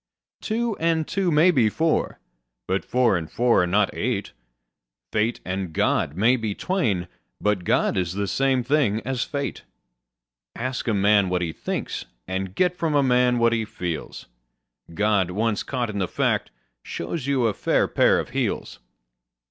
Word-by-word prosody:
Two 230 0 -1
and 165 -1 +1
two 195 -2 0
may 165 +3 +5
be 125 -9 +3
four: 160 +8 0 0.5
but 95 +1 -1
four 125 -5 +2
and 80 -3 -3
four 120 -4 +3
are 90 - +1
not 100 +3 +2
eight: 115 -4 -2 0.8
Fate 110 +2 0
and 95 -2 -3
God 75 -1 +1
may 115 +7 +4
be 110 -4 -3
twain: 115 - -1 0.3
but 105 -3 0
God - - +2
is 90 -2 -1
the 100 +1 -1
same 135 +3 +1
thing 125 -5 +1
as 130 -2 -1
fate. 140 -1 -4 0.9
Ask 130 +1 -3
a 110 - +2
man 100 -1 +4
what 90 -1 0
he 80 -2 -3
thinks, - - -4 0.2
and 95 0 -3
get 180 -1 +2
from 165 -4 -1
a 140 - +4
man 125 -1 +3
what 115 0 +3
he 115 -1 0
feels: 90 -7 -5 0.7
God, 100 0 +1
once 105 +3 0
caught 125 -4 -2
in 100 - -4
the 95 - 0
fact, - - 0 0.3
shows 135 - -5
you 135 -4 +2
a 110 - +2
fair - - +1
pair - - +3
of - - -5
heels. - - -2
115 Hz, 165 wpm, -24 LUFS, 95-135 Hz, 0.9 s, may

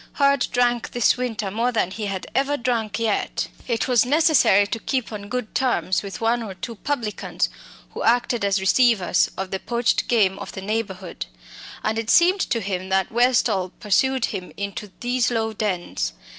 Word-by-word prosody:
Hurd 280 -2 +3
drank 245 -1 +1
this 240 -2 +3
winter 225 -5 -3
more 230 +4 0
than 200 -6 0
he 210 +1 -4
had 195 -2 -4
ever 280 +2 +1
drunk 235 -4 -1
yet. 225 -3 -1 0.2
It 235 -3 0
was 250 -3 +4
necessary 290 - +4
to 225 +3 -4
keep 255 0 -2
on 205 -1 -7
good 250 -2 -4
terms 245 -7 +1
with 200 -1 -7
one 230 +1 +1
or 205 -4 -6
two 230 +6 -6
publicans 230 -2 -2 0.4
who - - -6
acted 240 -1 +2
as 200 -1 +2
"receivers" 195 -1 +3
of 190 -1 -4
the 190 - -2
poached 235 +3 0
game 200 -5 +2
of - - -7
the 190 - -6
neighbourhood. 195 -3 -4 0.6
And 220 +1 0
it 225 0 -4
seemed 360 +3 +5
to 230 - 0
him 190 -1 -3
that 190 -1 +1
Westall 230 -6 +2
pursued 260 +5 +2
him 185 -3 -6
into 200 0 -5
these 245 0 +1
low 225 -2 -1
dens. 180 - -2
225 Hz, 175 wpm, -23 LUFS, 195-245 Hz, 0.6 s, seemed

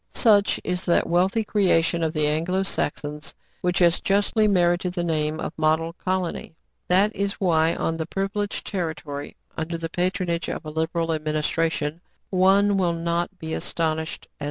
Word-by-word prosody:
Such 210 -4 +4
is 180 0 -2
that 170 - +3
wealthy 185 +6 +2
creation 175 -5 +2
of 160 -1 +1
the 155 -2 0
Anglo 165 +6 0
Saxons, 150 -4 -3 0.3
which 180 0 0
has 170 -1 +4
justly 205 +2 +2
merited 175 -2 +2
the 175 -2 -2
name 155 -2 -1
of - - -4
" - - -48
Model 160 +1 +2
Colony.*' 185 -2 -3 0.3
That 195 +4 +3
is 200 0 -1
why, 165 -3 +2
on 165 - -1
this 160 -1 -3
privileged 200 +1 -2
territory, 160 -6 -4 0.2
under 165 +1 -3
the 165 0 -4
patronage 180 0 -1
of - - -5
a 155 - -5
liberal 165 +1 -1
administration, 155 +1 -1 0.3
one 195 +2 +4
will 175 -3 +2
not 170 +3 -2
be 160 -2 -5
astonished, 160 -1 -2
as - - -38
M. - - -51
170 Hz, 165 wpm, -24 LUFS, 160-190 Hz, 0.3 s, Such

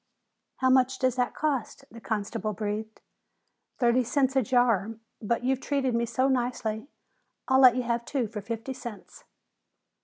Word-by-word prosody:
"How 260 0 +2
much 260 0 +3
does 255 -2 +1
that 250 -1 0
cost?" 280 -2 -2
the 230 - -11
constable 215 0 -3
breathed. 215 +1 -4 0.8
"Thirty 245 0 +3
cents 265 +2 +1
a 265 - +4
jar, 230 -4 +2 0.3
but 235 +2 -1
you've 265 +1 0
treated 270 -2 0
me 235 0 0
so 255 +3 +1
nicely, 245 -3 -1 0.6
I'll 260 0 +4
let 250 -2 +8
you 255 - 0
have 235 0 -1
two 270 -4 -1
for 210 -1 -6
fifty 230 +5 -5
cents." 245 - -10
245 Hz, 155 wpm, -27 LUFS, 225-260 Hz, 0.8 s, let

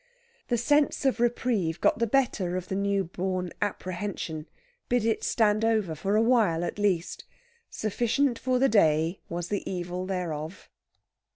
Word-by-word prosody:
The 240 - +1
sense 290 +4 +2
of 265 -3 +2
reprieve 235 -8 0
got - - +2
the 230 - +2
better 205 -8 +1
of 180 0 -6
the 190 - -2
new 200 0 +1
born 185 0 -3
apprehension 185 -5 -3 0.4
bid 245 -2 +2
it 225 -1 0
stand 215 -1 +2
over 215 -7 +1
for 195 +6 -1
a 220 - +4
while, 220 -9 +3
at 190 - -4
least. 185 -5 0 0.5
Sufficient 240 +4 0
for 255 -1 +1
the 270 +2 +4
day 165 - +3
was 175 0 -4
the 205 - -1
evil 180 0 -4
thereof. 170 -2 -4
200 Hz, 155 wpm, -27 LUFS, 175-230 Hz, 0.5 s, a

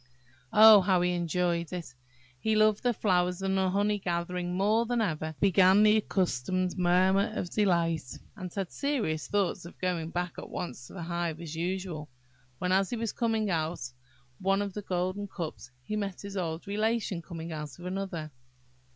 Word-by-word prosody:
Oh, 215 -1 +9
how 185 -1 +3
he 180 0 +2
enjoyed 175 -1 0
it! 170 -7 -6 0.5
He 220 +7 +1
loved 215 -1 +4
the 245 - +2
flowers 180 -4 +1
and 195 0 +1
the 190 -1 +2
honey 205 +2 +1
gathering 175 0 -2
more 215 +4 +2
than 245 0 0
ever, 160 -8 -1
and 155 -1 -7
began 195 +1 +5
his 215 +1 +6
accustomed 185 -2 0
murmur 185 +3 +3
of 175 - -3
delight, 170 -8 +1 0.2
and 185 -4 -7
had 195 -2 -4
serious 245 - -1
thoughts 200 -2 0
of 170 - -11
going 175 -3 -2
back 175 0 -3
at - - -9
once 125 -7 -6
to - - -14
the 175 - -6
hive 170 -1 -2
as 165 -2 -7
usual, 175 -3 -3 0.5
when 180 +5 -1
as 190 0 +3
he - - -2
was 225 -1 -2
coming 225 -3 0
out 160 -1 0
of 125 0 -7 0.5
one 195 +1 +2
of 200 -2 -5
the 210 - -4
golden 185 +2 -2
cups, 155 - -6
he 210 - -4
met 200 -3 -3
his 200 0 -7
old 165 -2 -3
Relation 215 -2 -1
coming 165 0 -7
out 150 -3 -6
of 175 - -11
another. 180 -4 -4
185 Hz, 185 wpm, -29 LUFS, 170-200 Hz, 0.5 s, Oh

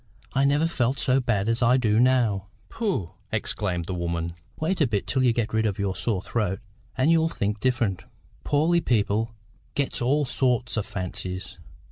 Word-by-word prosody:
I 135 +1 +3
never 145 +3 +3
felt 135 -5 0
so 130 -1 +2
bad 110 -5 0
as 115 +2 +1
I 125 +2 +5
do 110 -3 +2
now." 120 -6 +3 0.2
"Pooh!" 190 - -2 0.2
exclaimed 95 -5 -1
the 95 - -4
woman. 85 -1 -2 0.3
"Wait 170 +3 0
a 145 - +5
bit 105 -4 -1
till 130 - 0
you 125 -2 +4
get 115 -2 -1
rid 110 0 +2
of 100 - -2
your 100 -1 -1
sore 95 0 -1
throat, 105 -5 -1 0.4
and 135 +6 +4
you'll 165 0 +4
think 105 -6 -2
different. 115 -6 0 0.4
Poorly 165 +4 +3
people 115 -3 +1 0.4
gets 140 -4 -1
all 140 +4 +2
sorts 125 -2 0
o' 110 - +1
fancies. 95 -2 -5
115 Hz, 175 wpm, -25 LUFS, 100-130 Hz, 0.4 s, I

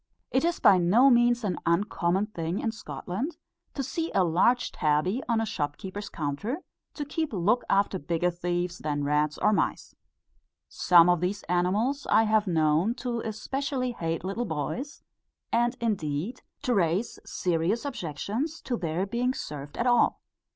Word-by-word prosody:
It 260 - +2
is 340 0 0
by 190 - +6
no 225 +11 +5
means 240 0 +4
an 190 -4 -1
uncommon 180 +1 +1
thing 170 -4 -4
in 225 - -1
Scotland, 225 - -5 0.4
to 275 - -2
see 325 +6 -3
a 190 - +5
large 185 +9 +2
tabby 160 - +1
on 230 -1 +2
a 225 - 0
shopkeeper's 190 +2 -4
counter, 170 - -3 0.3
kept 290 -1 -6
to 325 - 0
look 210 +8 +2
after 195 -1 +2
bigger 170 +3 0
thieves 175 0 -2
than 145 -1 -2
rats 150 +1 +1
or 210 - +3
mice. - - -1 0.7
Some 175 -2 +5
of 175 -2 +3
these 195 +3 -2
animals 205 +11 0
I 225 - +5
have 215 -1 +2
known 160 +5 +2
to 245 -2 -3
especially 255 +4 -2
hate 165 -7 -3
little 200 +6 -2
boys, 200 - -4 0.5
and 240 +2 +1
indeed 195 - -2 0.2
to 250 - +1
raise 190 +2 0
serious 180 - -1
objections 240 - -3
to 245 -2 -2
their 170 +1 -1
being 245 +5 -1
served 145 0 -7
at 235 - 0
all. 240 -1 +3
200 Hz, 155 wpm, -27 LUFS, 170-240 Hz, 0.7 s, by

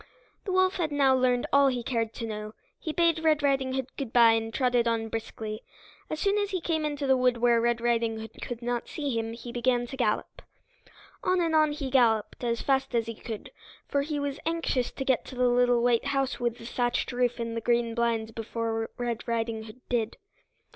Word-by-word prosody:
The 390 - -2
wolf 375 0 +3
had 325 -4 -1
now 275 -2 +4
learned 250 -1 +2
all 280 0 +6
he 250 -2 0
cared 230 -2 -1
to 230 - -4
know. 215 -1 -6 0.2
He 315 - -3
bade 330 0 +2
Red 305 -2 +3
Riding 270 -2 +1
Hood 265 -1 -1
good 265 -5 -4
by 235 -2 +7
and 225 0 0
trotted 245 0 +2
on 225 -1 0
briskly. 220 -1 -5 0.5
As 310 - -3
soon 400 +3 +2
as 405 -1 0
he 375 -2 -1
came 320 -2 -1
into 290 -1 -3
the 265 -1 +4
wood 250 -1 +2
where 235 0 +3
Red 235 0 +1
Riding 230 -1 0
Hood 220 0 -10
could 240 -1 -5
not 240 0 -2
see 285 -5 -3
him 225 0 -2
he 235 +1 -8
began 245 0 +1
to 255 - -7
gallop. 235 -5 -1 0.8
On 365 0 +2
and 335 -2 +1
on 310 -1 +4
he 280 -3 -4
galloped 230 -4 +2
as 235 -1 -1
fast 265 -2 +1
as 230 -1 +2
he 230 - -5
could, 220 -1 -7 0.4
for 280 - +1
he 295 +1 -2
was 285 0 -3
anxious 325 -6 0
to 270 - -5
get 260 -3 +2
to - - -9
the 250 0 +3
little 245 -1 +3
white 240 -1 +3
house 275 -1 0
with 240 -1 -1
the 230 - -11
thatched 240 +1 -1
roof 245 0 0
and 230 -1 -3
the 230 - -2
green 235 0 +1
blinds 230 -1 0
before 225 0 -3
Red 240 -1 -3
Riding 225 -1 -2
Hood 220 +3 -13
did. 230 -2 -1
245 Hz, 215 wpm, -28 LUFS, 230-275 Hz, 0.8 s, by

